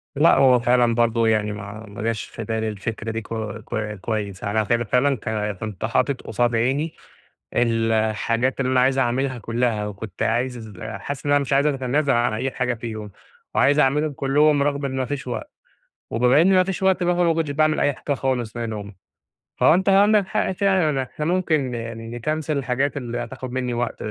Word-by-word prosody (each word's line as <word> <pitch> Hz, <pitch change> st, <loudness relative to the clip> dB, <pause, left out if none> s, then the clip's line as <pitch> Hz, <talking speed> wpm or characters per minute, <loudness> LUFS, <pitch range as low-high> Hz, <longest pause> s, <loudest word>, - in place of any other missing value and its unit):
لأ 150 Hz, +4 st, +5 dB
هو 130 Hz, -2 st, +5 dB
فعلًا 120 Hz, -1 st, +3 dB
برضو 115 Hz, -1 st, +2 dB
يعني 110 Hz, -1 st, +2 dB
ما 105 Hz, +1 st, -8 dB
ما 100 Hz, -, -8 dB
جاش 115 Hz, -1 st, -1 dB
في 115 Hz, -, -8 dB
بالي 110 Hz, +1 st, -2 dB
الفكرة 110 Hz, +2 st, -4 dB
دي 115 Hz, -, -3 dB
ك 105 Hz, -, -15 dB, 0.4 s
ك 105 Hz, -3 st, -3 dB
كويّس، 100 Hz, -4 st, -3 dB
أنا 110 Hz, +2 st, +1 dB
ف 105 Hz, -, -6 dB
فعلًا 125 Hz, +4 st, +2 dB
ك 110 Hz, -, -6 dB, 0.3 s
كنت 105 Hz, -1 st, -4 dB
حاطط 125 Hz, +4 st, 0 dB
قصاد 120 Hz, +2 st, 0 dB
عيني 135 Hz, +8 st, 0 dB, 0.6 s
الحاجات 115 Hz, +2 st, +1 dB
اللي 130 Hz, -, 0 dB
أنا 125 Hz, -, +4 dB
عايز 130 Hz, +1 st, +2 dB
أعملها 130 Hz, +1 st, 0 dB
كلّها، 115 Hz, -1 st, -1 dB
وكنت 105 Hz, -1 st, -6 dB
عايز 120 Hz, -2 st, -1 dB
حاسس 135 Hz, +6 st, -6 dB
إن -, -, +1 dB
أنا 145 Hz, -, +4 dB
مش 140 Hz, -1 st, -4 dB
عايز 140 Hz, +2 st, +4 dB
أتنازل 135 Hz, 0 st, +1 dB
عن 120 Hz, -1 st, +2 dB
أي 120 Hz, +5 st, -2 dB
حاجة 125 Hz, -1 st, -1 dB
فيهم، 110 Hz, -2 st, -6 dB, 0.4 s
وعايز 145 Hz, +1 st, +4 dB
أعملهم 150 Hz, +2 st, +2 dB
كلّهم 140 Hz, +2 st, +3 dB
رغم 140 Hz, 0 st, 0 dB
إن 135 Hz, -1 st, -2 dB
ما 130 Hz, -, 0 dB
فيش 140 Hz, 0 st, -5 dB
وقت، 125 Hz, -, -5 dB, 0.6 s
وبما 125 Hz, +5 st, +4 dB
إن 190 Hz, +3 st, +4 dB
ما 185 Hz, 0 st, +5 dB
فيش 190 Hz, 0 st, -4 dB
وقت 190 Hz, -1 st, +3 dB
بقى 175 Hz, 0 st, +2 dB
فما 170 Hz, -2 st, +3 dB
كنتش 160 Hz, -2 st, -1 dB
باعمل 155 Hz, +2 st, +2 dB
أي 145 Hz, -, +3 dB
حاجة 140 Hz, -, -2 dB
خالص 125 Hz, -4 st, -2 dB
منهم، 110 Hz, -3 st, -5 dB, 0.7 s
فهو -, -, +6 dB
أنت 190 Hz, +2 st, +1 dB
عندك 200 Hz, +1 st, +5 dB
حق 190 Hz, -, 0 dB
فعلًا 180 Hz, -8 st, +1 dB
إحنا 150 Hz, +4 st, -5 dB
ممكن 155 Hz, -7 st, 0 dB
يعني 115 Hz, -1 st, -6 dB
نكنسل 150 Hz, +5 st, -2 dB
الحاجات 135 Hz, +1 st, -1 dB
اللي 120 Hz, -4 st, -4 dB
هتاخد 130 Hz, -1 st, -8 dB
مِنّي 125 Hz, -1 st, -2 dB
وقت 120 Hz, 0 st, -2 dB
125 Hz, 190 wpm, -22 LUFS, 115-145 Hz, 0.7 s, فهو